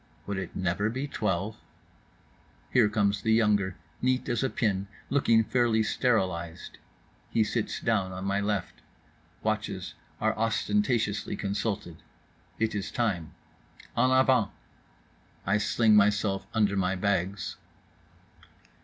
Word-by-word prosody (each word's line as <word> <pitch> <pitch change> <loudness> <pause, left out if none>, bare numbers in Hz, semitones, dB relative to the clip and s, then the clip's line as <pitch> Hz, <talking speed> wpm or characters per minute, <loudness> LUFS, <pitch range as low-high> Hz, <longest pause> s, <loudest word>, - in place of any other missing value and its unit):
Would 100 -1 -3
it 95 - -6
never 95 +3 0
be 130 +5 -3
Twelve? 105 -4 -2 1.1
Here 115 -5 +5
comes 100 -1 +1
the 110 +1 +2
younger, 105 -4 +2 0.3
neat 130 +1 +1
as 120 -2 0
a 135 - +1
pin, 100 -5 0 0.2
looking 115 -5 +4
fairly 115 -1 +2
sterilized. 95 -9 -1 0.5
He 110 - +3
sits 110 +1 -2
down 100 -5 0
on 95 +1 -5
my 100 0 +1
left. 100 -3 -2 0.6
Watches - - -2 0.3
are 110 0 +1
ostentatiously 115 - 0
consulted. 100 -3 -3 0.6
It 110 0 0
is 100 -1 -3
time. 95 -9 -2 0.6
En 125 +2 +3
avant. 130 -4 +4 1.0
I 105 +3 +2
sling 110 +1 +3
myself 105 -1 +3
under 105 -3 +2
my 95 -1 +1
bags. 95 0 -1
105 Hz, 120 wpm, -28 LUFS, 95-115 Hz, 1.1 s, Here